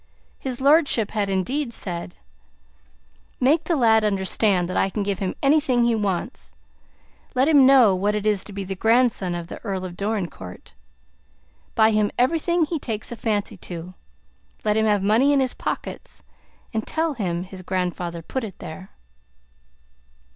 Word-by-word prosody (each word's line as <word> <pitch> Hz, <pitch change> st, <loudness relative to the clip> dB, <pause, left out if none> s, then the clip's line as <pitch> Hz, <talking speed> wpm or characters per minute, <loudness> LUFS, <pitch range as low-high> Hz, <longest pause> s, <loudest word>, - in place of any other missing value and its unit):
His 255 Hz, -2 st, -4 dB
lordship 280 Hz, -6 st, +3 dB
had, 205 Hz, -2 st, -1 dB
indeed, 235 Hz, +8 st, -1 dB
said: 175 Hz, -5 st, -4 dB, 1.2 s
"Make 300 Hz, +6 st, +3 dB
the 340 Hz, -, +1 dB
lad 225 Hz, -5 st, +4 dB
understand 195 Hz, -2 st, +1 dB
that 185 Hz, -, -5 dB
I 195 Hz, -, +2 dB
can 205 Hz, +1 st, -2 dB
give 200 Hz, -2 st, -2 dB
him 190 Hz, -2 st, -2 dB
anything 275 Hz, -4 st, +3 dB
he 235 Hz, 0 st, +3 dB
wants. 185 Hz, -, -3 dB, 0.8 s
Let 260 Hz, +2 st, +3 dB
him 285 Hz, -4 st, +6 dB
know 255 Hz, -7 st, +6 dB
what 205 Hz, +3 st, 0 dB
it 210 Hz, 0 st, -3 dB
is 210 Hz, -3 st, +2 dB
to -, -, -9 dB
be 200 Hz, 0 st, -5 dB
the 195 Hz, +1 st, -4 dB
grandson 225 Hz, -3 st, +2 dB
of 170 Hz, -1 st, -4 dB
the -, -, -9 dB
Earl 190 Hz, -4 st, -3 dB
of 175 Hz, -1 st, -7 dB
Dorincourt. 185 Hz, -, -5 dB, 1.0 s
Buy 220 Hz, 0 st, +5 dB
him 210 Hz, -1 st, +2 dB
everything 330 Hz, +6 st, +2 dB
he 320 Hz, 0 st, -3 dB
takes 220 Hz, -4 st, -5 dB
a -, -, -4 dB
fancy 210 Hz, -2 st, -2 dB
to; 175 Hz, 0 st, -8 dB, 0.7 s
let 210 Hz, 0 st, +2 dB
him 220 Hz, 0 st, +2 dB
have 205 Hz, -2 st, +2 dB
money 230 Hz, +8 st, +4 dB
in 280 Hz, -, +3 dB
his 260 Hz, -2 st, 0 dB
pockets, -, -, -5 dB, 0.5 s
and 220 Hz, 0 st, -2 dB
tell 320 Hz, -1 st, 0 dB
him 180 Hz, -8 st, -2 dB
his 185 Hz, 0 st, -10 dB
grandfather 180 Hz, -2 st, -3 dB
put 260 Hz, +9 st, -4 dB
it 200 Hz, -5 st, -7 dB
there." 185 Hz, +4 st, -9 dB
210 Hz, 160 wpm, -23 LUFS, 185-255 Hz, 1.2 s, him